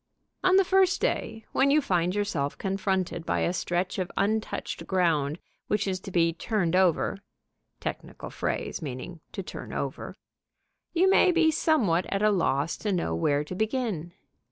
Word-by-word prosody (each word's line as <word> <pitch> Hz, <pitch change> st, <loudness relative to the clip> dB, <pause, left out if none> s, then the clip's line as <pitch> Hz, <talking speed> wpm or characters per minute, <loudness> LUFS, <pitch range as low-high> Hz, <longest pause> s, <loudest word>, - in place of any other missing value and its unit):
On 370 Hz, 0 st, +5 dB
the 390 Hz, 0 st, +5 dB
first 380 Hz, 0 st, +3 dB
day, 220 Hz, -1 st, -2 dB
when 275 Hz, -, +3 dB
you 295 Hz, +2 st, +5 dB
find 180 Hz, -, 0 dB
yourself 175 Hz, -9 st, -1 dB
confronted 190 Hz, -3 st, -1 dB
by -, -, 0 dB
a 175 Hz, -, +1 dB
stretch 180 Hz, +1 st, -1 dB
of 185 Hz, 0 st, -2 dB
untouched 215 Hz, +2 st, -1 dB
ground 160 Hz, -6 st, +1 dB, 0.3 s
which 205 Hz, -1 st, 0 dB
is 185 Hz, -1 st, -1 dB
to 195 Hz, -, -9 dB
be 170 Hz, -2 st, +2 dB
turned 180 Hz, -1 st, 0 dB
over 185 Hz, +1 st, +2 dB, 0.6 s
(technical -, -, -6 dB
phrase, -, -, -3 dB
meaning 150 Hz, +4 st, -6 dB
to 195 Hz, -, -5 dB
"turn -, -, -8 dB
over"), -, -, -4 dB, 0.7 s
you 360 Hz, +2 st, +3 dB
may 380 Hz, -1 st, +5 dB
be 335 Hz, -2 st, +4 dB
somewhat 245 Hz, -, +2 dB
at 195 Hz, +1 st, -1 dB
a 215 Hz, -, +5 dB
loss 165 Hz, -5 st, +1 dB
to 210 Hz, -, -2 dB
know 170 Hz, -, 0 dB
where 145 Hz, -, +1 dB
to 150 Hz, -, -7 dB
begin. 215 Hz, -, -2 dB
190 Hz, 160 wpm, -27 LUFS, 170-220 Hz, 0.7 s, On